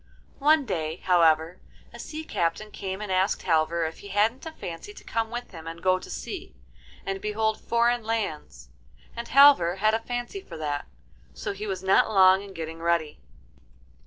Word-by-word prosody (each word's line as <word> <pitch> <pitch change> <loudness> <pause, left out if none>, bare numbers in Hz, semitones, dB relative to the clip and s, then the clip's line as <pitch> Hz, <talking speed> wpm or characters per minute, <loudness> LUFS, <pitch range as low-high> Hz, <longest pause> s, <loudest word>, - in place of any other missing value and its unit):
One 300 0 +4
day, 160 -7 -2
however, 165 -1 +2 0.3
a - - -11
sea 310 0 -6
captain 195 - -2
came 190 +1 -5
and 210 -2 -4
asked 185 +1 +1
Halvor 165 0 +1
if 160 - -9
he 200 - -10
hadn't 215 - 0
a - - -5
fancy 250 - -8
to - - -13
come 225 -1 -2
with 240 +1 -6
him 165 -3 -10
and 165 +1 -7
go 185 +1 +2
to - - -11
sea, 380 -1 -7 0.5
and 195 0 -3
behold 220 +1 -1
foreign 235 +1 +2
lands. 160 - -4 0.5
And 235 0 -5
Halvor 270 -11 +6
had 215 +3 +2
a 225 - +2
fancy 245 - -5
for 385 - -10
that, 145 -2 -3 0.5
so - - -4
he 210 +2 -6
was 190 -2 -4
not 190 +3 +4
long 190 -2 +6
in 200 -1 -11
getting 165 0 -6
ready. 165 -2 0
195 Hz, 180 wpm, -26 LUFS, 165-230 Hz, 0.5 s, Halvor